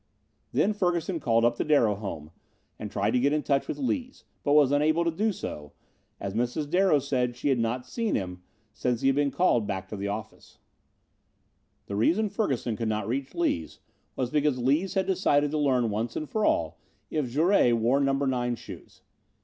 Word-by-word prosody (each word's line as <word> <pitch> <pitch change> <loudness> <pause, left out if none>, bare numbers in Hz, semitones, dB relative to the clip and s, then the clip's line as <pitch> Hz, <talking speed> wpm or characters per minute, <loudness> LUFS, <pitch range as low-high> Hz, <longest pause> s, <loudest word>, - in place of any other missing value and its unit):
Then 215 - +2
Ferguson 175 -3 -1
called 115 -4 +2
up 120 0 +2
the - - 0
Darrow 140 -8 +3
home 95 -7 -7 0.5
and 105 - -5
tried 100 +1 0
to 125 - +2
get 140 +3 +2
in 150 -1 0
touch 140 -1 +1
with - - -4
Lees, 260 -1 -3 0.2
but 145 - +2
was 145 -3 +5
unable 155 +4 +2
to 170 - +2
do 215 +7 0
so, 75 - -7 0.5
as 100 -1 -4
Mrs. 125 +6 -1
Darrow 180 0 +3
said 130 -3 -1
she 135 +4 -2
had 130 -3 +2
not 120 +2 -1
seen 225 - -2
him 90 -2 -4 0.3
since 120 +1 -1
he 135 - +3
had 135 - +2
been 145 0 +2
called 120 - +2
back 95 - -4
to - - -5
the 100 0 -4
office. 105 +2 -7 1.3
The 100 - -5
reason 185 - +2
Ferguson 135 - -1
could 115 0 -2
not 105 -2 -2
reach 135 +6 -3
Lees 125 - -1 0.4
was 125 -2 -2
because 150 -3 +1
Lees 145 +11 +1
had 190 -1 +2
decided 145 -7 +2
to 155 - -1
learn 130 -6 +2
once 115 +3 -3
and 155 - -3
for 215 +6 -1
all 80 -2 0 0.3
if 150 -5 -1
Jouret 155 -1 +3
wore 120 +5 +2
number 135 0 +1
nine 125 -2 0
shoes. - - -12
135 Hz, 195 wpm, -27 LUFS, 115-155 Hz, 1.3 s, was